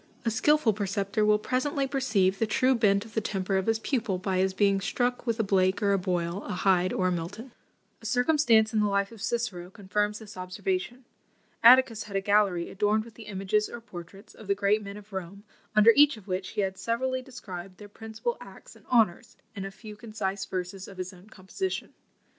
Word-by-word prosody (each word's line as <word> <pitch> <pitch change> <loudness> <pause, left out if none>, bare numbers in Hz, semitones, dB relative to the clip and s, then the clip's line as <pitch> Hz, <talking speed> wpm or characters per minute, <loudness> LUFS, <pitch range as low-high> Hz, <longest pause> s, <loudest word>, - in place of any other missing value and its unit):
A 230 - +2
skilful 295 +1 +3
preceptor 200 +1 -1
will 210 0 +4
presently 260 +5 -1
perceive 225 -9 +1
the 225 - +1
true 255 +4 +3
bent 205 -3 +2
of 220 - -14
the 220 - 0
temper 195 -2 -2
of 190 - -1
his 225 0 +3
pupil, 225 -5 -1
by 185 0 -1
his 190 +1 +2
being 195 0 +2
struck 245 +3 -1
with 230 0 0
a - - +3
Blake 190 -2 +2
or 200 -1 +3
a 195 - +2
Boyle, 180 0 -2
a - - -4
Hyde 185 -1 +2
or 185 -1 +1
a - - -1
Milton." 180 +9 -5 0.5
A 225 - -6
circumstance 245 -3 +3
in 220 - +2
the 210 - +3
life 200 0 0
of 225 -3 -12
Cicero 220 -7 -2
confirms 205 +1 -2
this 215 -2 -11
observation. 245 - -3 0.6
Atticus 240 -2 +6
had 200 -2 -9
a - - +3
gallery 195 -4 +2
adorned 210 +2 +1
with 230 - -13
the 220 0 -12
images 200 +1 0
or 235 - -7
portraits 195 -2 -11
of 215 - -13
the 200 - +2
great 205 +2 +2
men 200 0 -8
of 210 0 -14
Rome, 190 +2 -6 0.3
under 215 +2 +8
each 290 -3 +6
of 205 -2 -15
which 190 0 -3
he - - +3
had 190 -1 -2
severally 255 +3 -1
described 190 -8 -9
their 205 - -11
principal 220 - -5
acts - - -13
and - - -21
honours, 225 -8 +1 0.2
in 195 -2 -5
a - - -4
few 210 +2 -11
concise 205 -3 -4
verses 185 0 -5
of 195 - -12
his 185 0 -5
own 185 +3 -17
composition. 215 - -5
210 Hz, 210 wpm, -28 LUFS, 190-230 Hz, 0.6 s, under